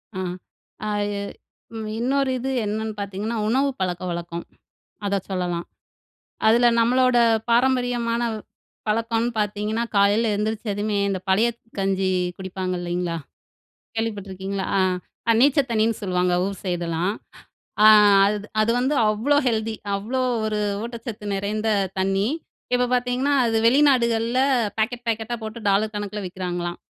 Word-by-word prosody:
அ. - - -3 0.7
அது 205 -1 0 0.7
ம். 220 -1 -5
இன்னொரு 265 +2 +1
இது 260 +2 -3 0.2
என்னன்னு 220 +1 -2
பார்த்தீங்கன்னா, 200 +3 -3
உணவு 265 +5 +2
பழக்கவழக்கம் 175 -2 -3 0.6
அத 200 0 +1
சொல்லலாம் 175 -2 -2 0.8
அதில 235 +2 +5
நம்மளோட 250 +2 +3 0.3
பாரம்பரியமான 240 -1 +2 0.7
பழக்கம்னு 230 +2 0
பார்த்தீங்கன்னா 210 +2 -1
காலையில 205 +3 +3
எழுந்திரிச்சதுமே 210 -1 -2
இந்த 190 -1 -1
பழைய 205 +5 +4 0.3
கஞ்சி 195 -1 +1 0.3
குடிப்பாங்க 185 -1 -4
இல்லைங்களா, 175 -1 -2 0.8
கேள்விப்பட்டுருக்கீங்களா? 200 -3 -3 0.6
அ - - +8
நீச்ச 280 +3 +5
தண்ணின்னு 225 -1 +1
சொல்லுவாங்க. 180 -2 +1
ஊர் 195 0 -4
சைடுலாம். 175 0 -1 0.7
அ - - +10 0.4
அது 205 +1 -1
அது 215 +2 +2
வந்து 265 +4 +1 0.2
அவ்ளோ 240 +8 +2
ஹெல்த்தி. 225 -1 0 0.2
அவ்ளோ 230 +7 -2 0.2
ஒரு 215 -1 -1 0.2
ஊட்டச்சத்து 230 -2 -7
நிறைந்த 210 +3 -1 0.3
தண்ணி. 195 +2 +1 0.5
இப்ப 245 0 +3
பார்த்தீங்கன்னா, 250 +3 +1
அது 225 -1 +1
வெளிநாடுகள்ல 240 -3 +3 0.4
பாக்கெட் 240 +2 -1
பேக்கெட்டா 225 +1 -2
போட்டு 220 +2 -6
டாலர் 210 +2 +2
கணக்கில 205 0 -4
விக்கிறாங்களாம். 175 -1 -4
215 Hz, 115 wpm, -23 LUFS, 195-235 Hz, 0.8 s, அ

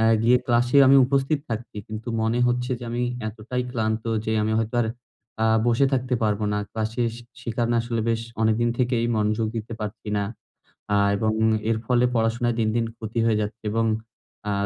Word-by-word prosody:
আ - - +3 0.2
গিয়ে 120 +2 +5
ক্লাসে 120 +2 +2
আমি 135 +1 +7
উপস্থিত 140 +2 +1
থাকছি 115 -1 -5
কিন্তু 110 +2 -6
মনে 110 +2 +1
হচ্ছে 125 +1 0
যে, 125 - -8
আমি 120 +1 -1 0.3
এতটাই 115 +4 -4
ক্লান্ত 110 -2 -1 0.2
যে, 110 - -1
আমি 110 +1 0
হয়তো 115 +1 -2
আর 115 - +1 0.6
আ - - +3 0.2
বসে 120 +3 +4
থাকতে 130 -1 +1
পারবো 105 -1 +1
না 105 -1 -1
ক্লাসে। 110 +2 -1 0.4
সে - - -8
কারনে 120 0 +1
আসলে 115 -1 -2
বেশ 115 -1 +1 0.2
অনেকদিন 110 +2 +2
থেকেই 120 -2 +1
মনোযোগ 110 +1 +1
দিতে 110 +1 -5
পারছি 105 +1 -6
না। 100 - 0 0.7
আ - - +4 0.2
এবং 110 +2 +1 0.4
এর 115 - +1
ফলে 125 0 +3
পড়াশোনায় 115 +1 +1
দিন, 110 -1 +2
দিন 115 -1 +1
ক্ষতি 110 +1 -5
হয়ে 110 -2 +3
যাচ্ছে, 105 +2 -4
এবং 115 +1 +1 0.6
আ - - +1
115 Hz, 185 wpm, -24 LUFS, 110-120 Hz, 0.7 s, আমি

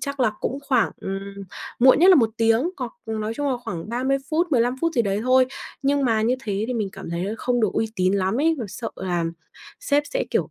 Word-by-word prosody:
chắc 280 -1 -4
là 245 -4 +4
cũng 270 - -2
khoảng, 250 -7 +3
ừm, 195 0 -4 0.6
muộn 260 +2 +6
nhất 355 +4 +6
là - - +9
1 230 -6 +3
tiếng, 225 +8 +2
hoặc 250 -4 -5
nói 220 0 -3
chung 290 +3 -1
là 255 - 0
khoảng 170 +1 -5
30 255 +4 0
phút, 330 +3 +2
15 245 0 +3
phút 330 0 +1
gì 240 - +3
đấy 200 -1 -1
thôi. 255 +1 +4 0.4
Nhưng 280 0 +2
mà 225 -3 +2
như 235 +3 +2
thế 205 -1 -1
thì 250 - -1
mình 215 -4 -1
cảm 195 -3 -8
thấy 170 +2 -2
là 205 - -2
không 245 -1 0
được 215 - +1
uy 225 - 0
tín 185 0 +2
lắm 195 +5 0
ấy, 325 +2 +3
và 240 - -3
sợ 210 +5 -5
là 175 -3 -1 0.6
sếp 290 -12 +2
sẽ, - - -1
kiểu, - - 0
235 Hz, 245 wpm, -23 LUFS, 205-270 Hz, 0.6 s, là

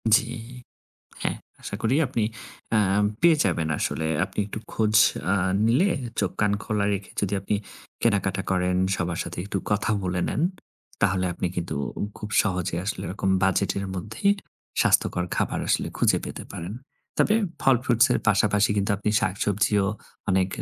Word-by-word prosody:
জি। - - +3 1.0
হ্যাঁ, - - -1 0.2
আশা - - -5
করি 115 +4 +2
আপনি 120 -3 -1 0.5
আম 105 -1 +3 0.2
পেয়ে 170 -2 +6
যাবেন 85 -4 0
আসলে। 80 - -1 0.2
আপনি - - -6
একটু 105 +1 -6
খোঁজ 110 -1 +1 0.4
আ - - +4 0.3
নিলে, 130 - +4 0.3
চোখ, 100 - +1
কান 105 -1 +3
খোলা 105 -2 0
রেখে 100 0 -5
যদি 100 0 -1
আপনি 100 +2 0 0.5
কেনাকাটা 100 -3 +1
করেন, 90 0 +1 0.2
সবার 85 -2 -2
সাথে 85 - -8
একটু 100 - -2
কথা 105 +2 +1
বলে 90 -1 -1
নেন, - - -1 0.6
তাহলে 95 -2 +2
আপনি 90 - -2
কিন্তু 85 -1 -3 0.2
উ - - -2 0.2
খুব 105 - -6
সহজে 90 -4 -1
আসলে 100 - -3
ওরকম 95 0 -2
বাজেটের 100 +1 +1
মধ্যেই 110 - 0 0.5
স্বাস্থ্যকর 90 - +2
খাবার - - 0
আসলে - - +1
খুঁজে - - +4
পেতে - - -6
পারেন। 85 +5 -6 0.4
তবে 210 - +4 0.3
ফল 135 -1 +5
fruits 120 -3 +5
এর - - +3
পাশাপাশি 105 0 +3
কিন্তু 100 0 +1
আপনি 105 +2 -1
শাকসবজিও 100 +1 +1 0.4
অনেক 95 -1 +3
100 Hz, 155 wpm, -25 LUFS, 95-105 Hz, 1.0 s, পেয়ে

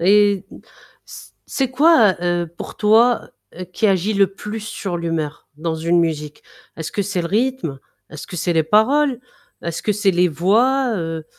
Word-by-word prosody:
Et 200 +1 +3 0.6
c - - -12 0.2
c'est 265 -2 -1
quoi, 260 - +5
heu, 175 -1 0
pour - - -8
toi, 225 +3 +3 0.3
heu, 185 - -5
qui 180 +5 -1
agit 195 +1 +1
le 200 0 +4
plus 210 +3 -7
sur 200 -4 -5
l'humeur 165 -3 -4
dans 160 +1 -3
une 165 +2 +1
musique? 150 -3 -2 0.3
Est-ce 160 0 -6
que - - -2
c'est 190 -2 -2
le 170 - -2
rythme? 230 - -1 0.3
Est-ce 155 -1 -9
que 180 - -8
c'est 175 +1 0
les 165 -1 +2
paroles? 250 - +2 0.4
Est-ce 170 -1 -4
que 210 - +1
c'est 200 -1 +2
les 180 0 +2
voix, 235 - +2
heu 165 -2 -4
190 Hz, 175 wpm, -20 LUFS, 170-220 Hz, 0.6 s, quoi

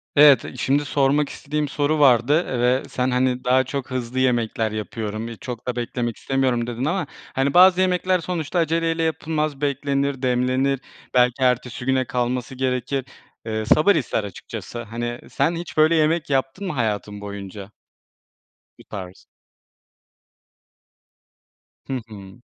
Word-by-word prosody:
Evet, 145 -2 +7
şimdi 140 +3 +1
sormak 140 +1 +2
istediğim 150 +1 -3
soru 145 +2 0
vardı, 140 +4 +4
eee, 125 - -2
ve 125 +2 +2
sen, 125 0 -1
hani, 125 0 +1
daha 130 +1 +4
çok 135 0 -5
hızlı 130 0 -3
yemekler 115 -3 +1
yapıyorum, 110 0 -4
iii, 115 -1 -8
çok 125 -2 -7
da 125 - -1
beklemek 120 -1 -3
istemiyorum 130 -3 0
dedin 120 +2 -3
ama, 170 0 -1 0.3
hani, 135 +1 +1
bazı 185 +1 +7
yemekler 185 0 +2
sonuçta 170 0 -2
aceleyle 165 0 +1
yapılmaz, 155 -2 -1
beklenir, 140 -1 -1
demlenir, 130 +1 +1 0.3
belki 125 +1 +3
ertesi 125 -1 0
güne 130 0 +2
kalması 125 +1 -2
gerekir. 130 +1 -1 0.4
Iıı, 110 -1 -2
sabır 155 - +5
ister 115 -4 0
açıkçası, 105 +4 -7
hani. 120 +2 -4
Sen 170 - +1
hiç 170 -1 -7
böyle 155 +2 +5
yemek 160 0 +2
yaptın 135 +8 -1
mı 180 - -2
hayatın 105 -4 -2
boyunca? 100 0 -8 1.1
Bu - - -14
tarz. 95 -3 -9 2.6
Hı 135 - -3
hı. 100 0 -12
130 Hz, 140 wpm, -22 LUFS, 120-150 Hz, 2.6 s, Evet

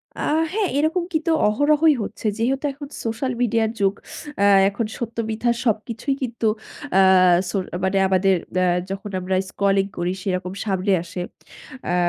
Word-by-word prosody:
আ - - -11 0.3
হ্যাঁ, 415 -4 0
এরকম 320 +4 +1
কিন্তু 315 +1 +1 0.2
অহরহই 295 +7 +4
হচ্ছে। 205 - -8
যেহেতু 265 +5 0
এখন 285 +1 -9 0.2
সোশ্যাল 230 +3 -2
মিডিয়ার 225 -2 +2
যুগ 195 -1 +2 0.5
আ - - +4 0.3
এখন 200 +3 -3
সত্য 235 -1 -6
মিথ্যা 225 +2 0
সবকিছুই 230 +4 -1
কিন্তু 235 -2 -2 0.5
আ - - +7 0.5
সো 195 - -1 0.3
মানে 190 +1 +1
আমাদের 190 0 +3 0.2
অ্যা 185 0 +3 0.2
যখন 195 +1 -5
আমরা 185 +1 -1 0.2
স্কলিং 195 -1 +2
করি 175 +1 -1
সেরকম 185 -1 -2
সামনে 195 -1 +1
আসে। 175 +1 -6 0.6
অ্যা 175 - 0
220 Hz, 150 wpm, -22 LUFS, 195-265 Hz, 0.6 s, আ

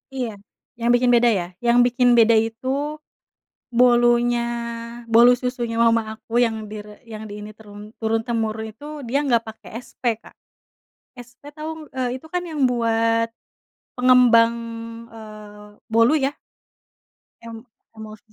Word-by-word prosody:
Iya, 250 -3 -2 0.5
yang 235 +1 0
bikin 245 0 +3
beda 240 0 +5
ya, 190 -6 0 0.2
yang 240 +1 +5
bikin 245 0 +3
beda 230 0 +6
itu, 225 +3 -1 1.0
bolunya 240 0 +3 0.7
bolu 235 +2 +6
susunya 240 -2 -3
mama 230 -1 +2
aku 230 - -6
yang 220 -2 -1
di 210 -1 -7
re 210 0 -14
yang 215 -1 -8
di 205 - -7
ini, 210 0 -9
turun 210 0 -13
turun-temurun 225 0 -1
itu 255 - -15 0.2
dia 275 +4 +1
nggak 235 -3 +2
pakai 220 - -12 0.2
SP 235 -3 -2
Kak, - - -18 0.8
SP 245 +1 -14
tau? 315 0 -7
Eee, 255 0 -2
itu 320 - -15
kan 355 +2 -3
yang 305 -6 0
buat, 230 -1 +1 0.6
pengembang, 250 -2 +5 0.6
eee, 210 -1 -12 0.2
bolu 230 +5 +3
ya. 275 +2 -1 1.1
Em 230 -1 -10 0.3
emuls 215 -1 -10
230 Hz, 135 wpm, -22 LUFS, 220-245 Hz, 1.1 s, beda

